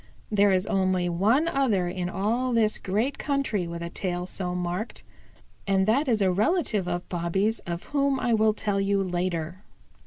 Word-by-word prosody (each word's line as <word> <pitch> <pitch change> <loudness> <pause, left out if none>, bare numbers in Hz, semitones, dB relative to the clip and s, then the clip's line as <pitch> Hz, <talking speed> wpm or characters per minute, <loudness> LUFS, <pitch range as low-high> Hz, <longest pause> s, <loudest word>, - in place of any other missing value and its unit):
There 205 -1 +4
is 185 +1 +2
only 185 -3 +1
one 215 - +2
other 240 - +1
in 180 0 -3
all 230 +7 0
this 220 -2 +2
great 220 +9 -1
country 275 - -1
with 170 0 -5
a 170 - -5
tail 180 -1 -3
so 180 -1 -3
marked, 180 +5 -4 0.6
and 190 -1 +3
that 265 +8 +2
is 220 -5 +2
a 190 - +3
relative 215 - +1
of 175 0 -3
Bobby's 190 +5 0
of 170 0 -4
whom 280 -2 0
I 245 -2 +1
will 215 -1 +3
tell 205 -2 -1
you 195 0 +1
later. 175 0 -3
195 Hz, 175 wpm, -26 LUFS, 180-225 Hz, 0.6 s, There